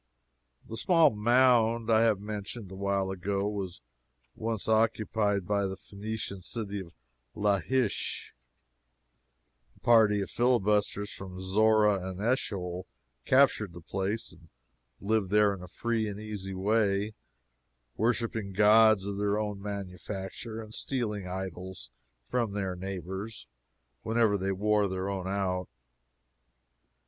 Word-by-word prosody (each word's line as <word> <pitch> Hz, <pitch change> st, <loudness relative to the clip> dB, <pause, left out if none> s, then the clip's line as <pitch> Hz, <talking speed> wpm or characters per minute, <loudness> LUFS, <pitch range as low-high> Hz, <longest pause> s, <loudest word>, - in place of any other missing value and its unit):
The 115 Hz, -, -6 dB
small 165 Hz, -2 st, +5 dB
mound 115 Hz, 0 st, +3 dB
I 110 Hz, 0 st, +5 dB
have 110 Hz, -4 st, +3 dB
mentioned 105 Hz, 0 st, -6 dB
a -, -, -7 dB
while 100 Hz, 0 st, 0 dB
ago 100 Hz, +2 st, -1 dB
was 100 Hz, -4 st, -4 dB, 0.5 s
once 110 Hz, -2 st, -3 dB
occupied 110 Hz, -3 st, +1 dB
by 100 Hz, +1 st, +1 dB
the 95 Hz, 0 st, -5 dB
Phenician 100 Hz, -1 st, -6 dB
city 105 Hz, +1 st, -4 dB
of 85 Hz, -7 st, -10 dB, 0.4 s
Laish. 105 Hz, +3 st, 0 dB, 1.4 s
A -, -, -23 dB
party 110 Hz, -3 st, +5 dB
of 100 Hz, -, -4 dB
filibusters 105 Hz, -4 st, +1 dB
from 95 Hz, -1 st, -8 dB
Zorah 105 Hz, +1 st, +3 dB
and 95 Hz, 0 st, -7 dB
Eschol 95 Hz, -6 st, -1 dB, 0.4 s
captured 130 Hz, -8 st, +4 dB
the 85 Hz, -, -9 dB
place, 95 Hz, +6 st, -3 dB
and 85 Hz, 0 st, -18 dB, 0.5 s
lived 105 Hz, -1 st, 0 dB
there 105 Hz, 0 st, +4 dB
in 95 Hz, -, -8 dB
a 90 Hz, -, -8 dB
free 115 Hz, +3 st, -1 dB
and 100 Hz, 0 st, -6 dB
easy 100 Hz, -3 st, -5 dB
way, 100 Hz, +1 st, +1 dB, 0.8 s
worshiping 110 Hz, -3 st, -1 dB
gods 105 Hz, 0 st, +6 dB
of 100 Hz, 0 st, -3 dB
their 105 Hz, 0 st, +1 dB
own 105 Hz, -2 st, -3 dB
manufacture 100 Hz, +2 st, -6 dB
and 110 Hz, 0 st, -12 dB
stealing 105 Hz, -8 st, -2 dB
idols 90 Hz, -7 st, -6 dB, 0.3 s
from 115 Hz, -, -1 dB
their 95 Hz, -3 st, -2 dB
neighbors 95 Hz, +3 st, -6 dB, 0.5 s
whenever 110 Hz, -, +2 dB
they 95 Hz, 0 st, -1 dB
wore 105 Hz, +1 st, +2 dB
their 95 Hz, +1 st, -3 dB
own 95 Hz, -2 st, -3 dB
out. 95 Hz, -2 st, -1 dB
105 Hz, 125 wpm, -29 LUFS, 95-110 Hz, 1.4 s, gods